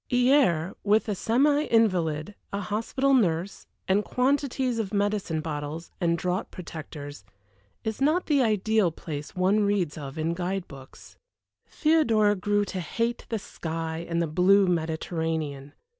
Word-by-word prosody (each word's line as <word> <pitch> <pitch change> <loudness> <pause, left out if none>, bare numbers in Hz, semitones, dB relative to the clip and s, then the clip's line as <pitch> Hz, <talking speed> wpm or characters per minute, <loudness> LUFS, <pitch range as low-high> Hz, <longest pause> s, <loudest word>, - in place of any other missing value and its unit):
Hyères, 245 - +3
with 210 +2 +3
a 210 - 0
semi 285 +9 +2
invalid, 185 -6 +1 0.2
a 200 - -2
hospital 230 +7 0
nurse, 185 -6 +1 0.2
and 195 +2 +3
quantities 260 -1 0
of 205 -4 -2
medicine 200 -6 0
bottles 155 +1 -5
and 170 -1 +2
draught 180 +3 -2
protectors, 150 - -8 0.6
is 220 +3 -4
not 310 +6 +2
the 290 -3 +3
ideal 220 -3 +2
place 150 -2 -7
one 190 +3 +3
reads 200 -7 0
of 140 -1 -7
in 160 +1 0
guide 185 +1 -3
books. 135 -1 -14 0.5
Theodora 235 -10 +3
grew 205 +2 +1
to 190 - -5
hate 230 +8 -2
the 225 - -1
sky 165 -4 -5
and 170 0 0
the 170 - +2
blue 185 +5 +4
Mediterranean. 160 -4 -2
190 Hz, 140 wpm, -26 LUFS, 160-220 Hz, 0.6 s, blue